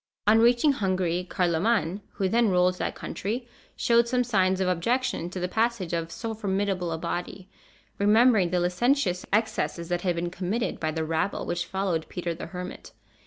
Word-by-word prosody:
On 215 Hz, +2 st, +5 dB
reaching 240 Hz, +5 st, +5 dB
Hungary, 185 Hz, -6 st, -1 dB
Carloman, 180 Hz, +2 st, +1 dB
who 195 Hz, -, 0 dB
then 230 Hz, +3 st, +3 dB
ruled 180 Hz, 0 st, +2 dB
that -, -, -2 dB
country, 235 Hz, +5 st, -4 dB, 0.3 s
showed 235 Hz, 0 st, +3 dB
some 250 Hz, +1 st, +1 dB
signs 190 Hz, -5 st, +2 dB
of 190 Hz, -, +1 dB
objection 230 Hz, +2 st, 0 dB
to 185 Hz, -, -5 dB
the 180 Hz, -, -1 dB
passage 220 Hz, -3 st, -1 dB
of 165 Hz, 0 st, -2 dB
so 225 Hz, +3 st, -4 dB
formidable 195 Hz, -4 st, -1 dB
a 165 Hz, -, -2 dB
body, 175 Hz, +3 st, -5 dB, 0.5 s
remembering 210 Hz, -2 st, +5 dB
the 180 Hz, +1 st, +1 dB
licentious 180 Hz, +2 st, +1 dB
excesses 210 Hz, -5 st, 0 dB
that 175 Hz, 0 st, 0 dB
had 180 Hz, -2 st, 0 dB
been 175 Hz, +1 st, -2 dB
committed 190 Hz, +6 st, -2 dB
by 155 Hz, -, -1 dB
the 160 Hz, 0 st, -2 dB
rabble 160 Hz, +5 st, -1 dB
which 175 Hz, 0 st, -2 dB
followed 190 Hz, -4 st, -2 dB
Peter 175 Hz, -2 st, -3 dB
the 165 Hz, -, -7 dB
Hermit. 180 Hz, 0 st, -8 dB
185 Hz, 170 wpm, -26 LUFS, 175-225 Hz, 0.5 s, On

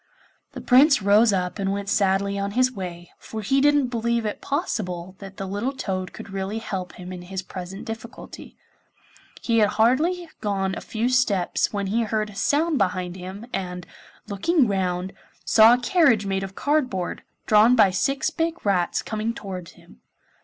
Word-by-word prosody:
The -, -, -7 dB
Prince 270 Hz, -2 st, +5 dB
rose 210 Hz, +3 st, +5 dB
up 185 Hz, +1 st, -2 dB
and 195 Hz, 0 st, 0 dB
went 200 Hz, 0 st, -3 dB
sadly 200 Hz, 0 st, +1 dB
on 200 Hz, 0 st, -3 dB
his 255 Hz, 0 st, +4 dB
way, 175 Hz, -5 st, -7 dB
for 220 Hz, -1 st, -7 dB
he 270 Hz, +7 st, +2 dB
didn't 290 Hz, -2 st, +3 dB
believe 235 Hz, -1 st, -1 dB
it 210 Hz, -, -4 dB
possible 190 Hz, -, -3 dB
that 195 Hz, -1 st, -10 dB
the 195 Hz, -, -4 dB
little 205 Hz, +8 st, -2 dB
toad 185 Hz, -8 st, -4 dB
could -, -, -10 dB
really 195 Hz, +2 st, -3 dB
help 190 Hz, -5 st, -5 dB
him 180 Hz, 0 st, -9 dB
in 180 Hz, -, -8 dB
his 190 Hz, +1 st, -6 dB
present 185 Hz, +1 st, -8 dB
difficulty. 225 Hz, +2 st, -9 dB, 0.9 s
He 230 Hz, -1 st, +2 dB
had 210 Hz, -2 st, +4 dB
hardly 315 Hz, +11 st, +2 dB
gone 195 Hz, -2 st, -1 dB
a -, -, -6 dB
few 225 Hz, +2 st, -2 dB
steps 245 Hz, -8 st, +1 dB
when 200 Hz, -1 st, -2 dB
he 215 Hz, +5 st, 0 dB
heard 215 Hz, -1 st, -1 dB
a -, -, -15 dB
sound 300 Hz, +7 st, +1 dB
behind 185 Hz, -2 st, -1 dB
him, 190 Hz, +4 st, -8 dB
and, 180 Hz, -1 st, -4 dB, 0.4 s
looking 255 Hz, -, +2 dB
round, 185 Hz, -2 st, -1 dB
he -, -, -27 dB, 0.3 s
saw 225 Hz, +2 st, +7 dB
a -, -, -4 dB
carriage 250 Hz, -, +3 dB
made 195 Hz, -1 st, -1 dB
of 195 Hz, 0 st, -7 dB
cardboard, 255 Hz, -12 st, -1 dB, 0.2 s
drawn 215 Hz, +3 st, +5 dB
by 210 Hz, -5 st, +5 dB
six 270 Hz, +9 st, 0 dB
big 330 Hz, -3 st, -2 dB
rats, 180 Hz, -4 st, +1 dB
coming 220 Hz, +1 st, -3 dB
towards 185 Hz, -4 st, -7 dB
him. -, -, -20 dB
205 Hz, 175 wpm, -24 LUFS, 190-240 Hz, 0.9 s, saw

